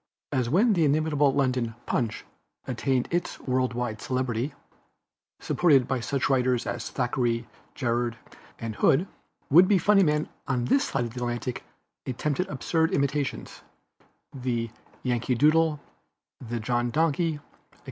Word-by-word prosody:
As 125 -3 0
when 210 - +4
the 170 -4 +2
inimitable 150 -1 +3
London 125 -4 0
Punch 115 -4 -2 0.4
attained 130 0 0
its 175 +1 -2
world 130 -2 0
wide 120 -3 -3
celebrity, 130 +1 -2 0.8
supported 140 -8 +3
by 130 -2 0
such 135 +3 -1
writers 125 -2 +1
as - - -4
Thackeray, 120 -2 -1 0.3
Jerrold 120 -2 -1 0.4
and 115 -2 -5
Hood, 165 +9 +3 0.4
would 175 +5 +8
be 205 - +4
funny 200 +3 +4
men 150 -3 +2 0.2
on 125 -3 0
this 275 - +3
side 135 - -1
of 115 - -7
the 125 - -6
Atlantic 120 0 -3 0.4
attempted 145 +7 -1
absurd 160 +2 0
imitations 140 -1 -1 0.7
the 120 -3 -2 0.3
Yankee 125 0 0
Doodle, 155 +3 +3 0.6
the 120 -1 -4
John 120 +2 0
Donkey, 160 +3 +1
etc. 145 - -13
130 Hz, 135 wpm, -26 LUFS, 120-150 Hz, 0.8 s, would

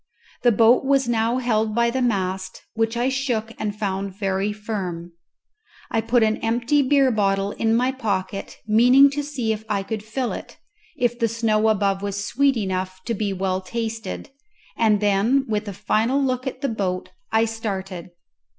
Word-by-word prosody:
The 245 - +5
boat 230 +4 +5
was 270 -1 +2
now 230 +1 +1
held 220 -4 0
by 235 0 +3
the 260 +1 -1
mast, 190 -5 -2
which 225 +1 0
I 240 +2 +1
shook 250 -5 -1
and 210 -1 -3
found 195 -2 -3
very 195 0 0
firm. 190 -5 -5 0.8
I 225 - +1
put 230 +1 +2
an 220 0 +2
empty 240 +6 +1
beer 275 -1 +3
bottle 200 -2 +1
in 225 +1 +1
my 250 +2 +2
pocket, 200 -6 -3
meaning 250 +6 +6
to 290 +1 -2
see 270 -6 -2
if 215 0 -7
I 200 -2 0
could 220 +1 -4
fill 235 +4 -3
it, - - -8 0.4
if 240 -1 0
the 230 - +2
snow 220 -1 +1
above 200 -2 +1
was 200 0 -3
sweet 275 +3 +2
enough 185 -2 -3
to 235 - -1
be 210 -1 -1
well 190 0 -1
tasted, 225 +4 -5 0.4
and 215 -2 +3
then 210 +7 +2
with 210 -1 -2
a - - -3
final 225 +7 +1
look 255 -1 -1
at 260 0 -5
the 275 - 0
boat 185 -5 -3 0.2
I 225 +1 +3
started. 195 -6 -5
220 Hz, 175 wpm, -23 LUFS, 200-240 Hz, 0.8 s, meaning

